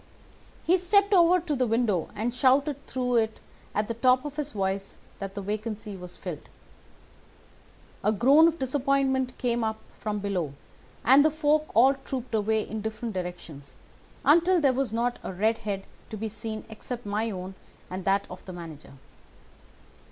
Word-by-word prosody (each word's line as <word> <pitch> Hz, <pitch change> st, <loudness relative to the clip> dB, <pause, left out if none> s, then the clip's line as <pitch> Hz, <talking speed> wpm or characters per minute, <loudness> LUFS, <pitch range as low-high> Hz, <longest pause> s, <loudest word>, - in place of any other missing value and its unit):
He 365 Hz, +2 st, +3 dB
stepped 400 Hz, +3 st, +3 dB
over 360 Hz, 0 st, +6 dB
to 325 Hz, -4 st, -2 dB
the 255 Hz, -2 st, +1 dB
window 220 Hz, -7 st, +1 dB
and 225 Hz, +3 st, -1 dB
shouted 275 Hz, +3 st, +2 dB
through 250 Hz, -2 st, 0 dB
it 220 Hz, -1 st, 0 dB, 0.4 s
at 210 Hz, 0 st, +1 dB
the 230 Hz, -, -2 dB
top 255 Hz, +3 st, +3 dB
of 295 Hz, -1 st, -5 dB
his 300 Hz, -1 st, -3 dB
voice 195 Hz, -1 st, -2 dB, 0.2 s
that 195 Hz, 0 st, -6 dB
the 200 Hz, -, -4 dB
vacancy 215 Hz, 0 st, -4 dB
was 180 Hz, -1 st, -9 dB
filled. 175 Hz, -6 st, -7 dB, 1.5 s
A 210 Hz, -, +3 dB
groan 275 Hz, +10 st, +6 dB
of 335 Hz, 0 st, 0 dB
disappointment 265 Hz, -1 st, +1 dB
came 240 Hz, -2 st, 0 dB
up 220 Hz, 0 st, -1 dB, 0.2 s
from 210 Hz, -1 st, -2 dB
below, 190 Hz, -8 st, -2 dB, 0.5 s
and 270 Hz, +4 st, +7 dB
the 310 Hz, -, +5 dB
folk 305 Hz, 0 st, +1 dB
all 260 Hz, +5 st, +7 dB
trooped 265 Hz, -3 st, -6 dB
away 220 Hz, 0 st, +1 dB
in 220 Hz, -1 st, -4 dB
different 220 Hz, +1 st, -4 dB
directions 175 Hz, -6 st, -6 dB, 0.5 s
until 345 Hz, +5 st, +5 dB
there 275 Hz, -4 st, +3 dB
was 260 Hz, -3 st, -1 dB
not 240 Hz, +2 st, -1 dB
a -, -, -5 dB
red 220 Hz, +5 st, +1 dB
head 200 Hz, -2 st, -3 dB, 0.3 s
to 215 Hz, -, -6 dB
be 220 Hz, +1 st, -3 dB
seen 215 Hz, 0 st, -6 dB
except 230 Hz, +2 st, -7 dB
my 210 Hz, +3 st, -1 dB
own 185 Hz, -2 st, -6 dB, 0.3 s
and 185 Hz, +1 st, -5 dB
that 195 Hz, +1 st, +2 dB
of 180 Hz, -, -10 dB
the 185 Hz, -, -8 dB
manager. 160 Hz, -5 st, -10 dB
225 Hz, 165 wpm, -27 LUFS, 200-270 Hz, 1.5 s, and